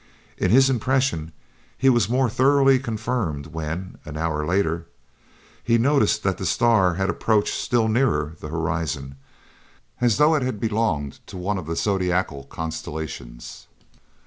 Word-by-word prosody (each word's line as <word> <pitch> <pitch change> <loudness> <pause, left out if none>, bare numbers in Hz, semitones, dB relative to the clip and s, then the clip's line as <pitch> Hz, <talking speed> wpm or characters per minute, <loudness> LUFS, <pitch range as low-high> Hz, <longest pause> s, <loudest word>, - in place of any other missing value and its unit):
In - - +1
his 130 +3 +6
impression 130 - 0 0.5
he 135 - +1
was 120 -6 +4
more 130 +1 +2
thoroughly 135 +2 +4
confirmed 110 - -3
when, 80 +4 -6
an 75 -1 -8
hour 80 -1 -1
later, 85 -2 0 0.8
he 115 0 +3
noticed 115 -4 +2
that 95 -1 0
the 95 - -3
star 105 -5 +3
had 95 +2 0
approached 105 +3 +1
still 120 -4 +1
nearer 110 - +1
the - - -7
horizon, 80 -4 -3 0.9
as 120 -3 +2
though 150 +2 +5
it 150 - +2
had 125 -5 -2
belonged 105 -11 -1
to - - -9
one 95 +2 -2
of 85 - -9
the 85 - -2
zodiacal 90 -7 -1
constellations. 75 -5 -7
95 Hz, 145 wpm, -23 LUFS, 80-120 Hz, 0.9 s, his